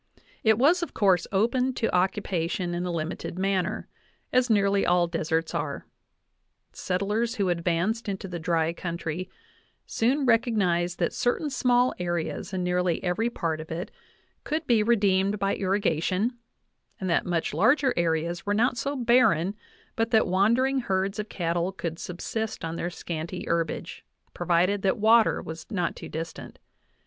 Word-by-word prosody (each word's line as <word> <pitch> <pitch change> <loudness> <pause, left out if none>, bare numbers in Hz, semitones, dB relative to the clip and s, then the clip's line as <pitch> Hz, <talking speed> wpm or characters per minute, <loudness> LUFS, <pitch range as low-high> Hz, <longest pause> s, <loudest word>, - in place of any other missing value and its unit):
It 220 -1 +4
was, 315 +9 +4
of 340 - -5
course, 190 -5 +3
open 250 +6 +1
to 225 - -1
occupation 180 -2 0
in 175 +1 -2
a - - -2
limited 165 +1 -4
manner, 195 +1 -1 0.5
as 255 0 +3
nearly 200 -2 +3
all 175 0 +3
deserts 165 -1 -1
are; - - -3 0.9
settlers 210 +6 -1
who 200 -5 0
advanced 175 +6 0
into 195 0 -4
the 175 -2 -5
dry 165 0 0
country 170 +1 -4 0.6
soon 265 +5 +1
recognized 195 -8 +2
that - - 0
certain 285 +5 0
small 250 -1 +3
areas 175 -1 -3
in 185 -2 -2
nearly 180 -1 0
every 190 +6 0
part 165 -8 -2
of 160 - -11
it 170 +4 -5 0.5
could 310 +2 -2
be 235 -5 +3
redeemed 200 -3 +2
by 195 0 0
irrigation, 195 +3 0 0.6
and 190 - -3
that 170 - +1
much 170 -2 -1
larger 255 - +3
areas 170 0 0
were 205 0 0
not 240 +3 +2
so 280 +3 -2
barren 235 - +3 0.4
but 225 0 0
that 220 -2 +4
wandering 235 +9 +2
herds 195 -2 -1
of 210 0 -4
cattle 170 +1 -1
could 170 -3 -5
subsist 215 +3 -4
on 165 0 -4
their 175 - -2
scanty 170 +1 -5
herbage, 165 -1 -2 0.3
provided 180 +3 +1
that 190 -1 +1
water 220 +1 +4
was 160 0 -8
not 180 -6 -1
too - - -9
distant. 165 +1 -7
190 Hz, 150 wpm, -26 LUFS, 175-225 Hz, 0.9 s, It